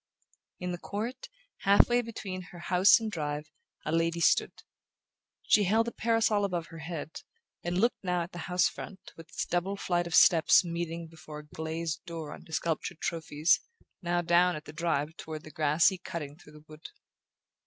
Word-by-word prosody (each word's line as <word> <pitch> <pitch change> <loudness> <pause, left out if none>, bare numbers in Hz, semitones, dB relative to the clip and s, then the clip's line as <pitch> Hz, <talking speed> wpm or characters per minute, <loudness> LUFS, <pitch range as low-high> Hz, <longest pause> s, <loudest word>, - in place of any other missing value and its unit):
In 180 0 -3
the 175 - -4
court, 235 - -5 0.3
half 200 +1 +5
way 245 0 +3
between 205 -5 -6
house 180 +3 +4
and 220 -1 -4
drive, 150 -3 -4 0.3
a 155 - -1
lady 165 +1 +1
stood. 170 - +2 0.8
She 205 - +4
held 225 +5 +2
a - - -2
parasol 225 -3 +2
above 175 -4 -1
her 165 - -9
head, 160 -1 -6 0.4
and 175 +1 -1
looked 235 +3 +1
now 180 -2 0
at 170 - -9
the 175 - -8
house 180 0 +3
front, 190 -2 -9
with 165 -1 -13
its - - -3
double 175 +3 -1
flight 175 -2 0
of 170 - -1
steps 165 +1 +6
meeting 170 -1 -4
before 155 -2 -11
a - - -19
glazed 160 +1 -4
door 160 -3 -6
under - - -13
sculptured 165 +1 -2
trophies, 160 -1 +1 0.4
now 175 -1 0
down 175 -1 +3
the 150 - -10
drive 160 -2 -1
toward 155 -1 -7
the 155 - -11
grassy 155 +5 +3
cutting 165 -6 -6
through 150 -2 -17
the 150 0 -15
wood. 155 +1 -11
170 Hz, 175 wpm, -30 LUFS, 160-185 Hz, 0.8 s, steps